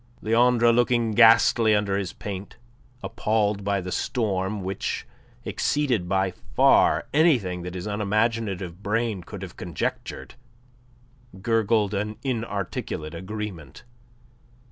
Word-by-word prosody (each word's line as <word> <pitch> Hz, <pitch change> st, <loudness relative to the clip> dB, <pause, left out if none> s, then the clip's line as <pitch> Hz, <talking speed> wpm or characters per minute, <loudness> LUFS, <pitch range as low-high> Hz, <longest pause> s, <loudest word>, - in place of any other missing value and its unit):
Leandre, 120 Hz, +1 st, +4 dB
looking 120 Hz, -1 st, +2 dB
ghastly 115 Hz, 0 st, +5 dB
under 105 Hz, -1 st, 0 dB
his 100 Hz, -2 st, -2 dB
paint, 100 Hz, -1 st, -7 dB, 0.5 s
appalled 105 Hz, -2 st, 0 dB
by 100 Hz, 0 st, 0 dB
the 90 Hz, 0 st, -6 dB
storm 100 Hz, -4 st, -1 dB
which 95 Hz, +1 st, -3 dB, 0.4 s
exceeded 125 Hz, -12 st, 0 dB
by 95 Hz, -1 st, +1 dB, 0.2 s
far -, -, +4 dB
anything 125 Hz, -, +2 dB
that 90 Hz, +1 st, -7 dB
his 90 Hz, -, -5 dB
unimaginative 105 Hz, -3 st, -1 dB
brain 110 Hz, -1 st, -1 dB
could 95 Hz, +3 st, -9 dB
have 90 Hz, -, -9 dB
conjectured, 65 Hz, -6 st, -4 dB, 1.1 s
gurgled 110 Hz, -2 st, +2 dB
an 105 Hz, +1 st, -3 dB
inarticulate 100 Hz, -, -3 dB
agreement. 95 Hz, -, -7 dB
105 Hz, 105 wpm, -25 LUFS, 95-115 Hz, 1.1 s, ghastly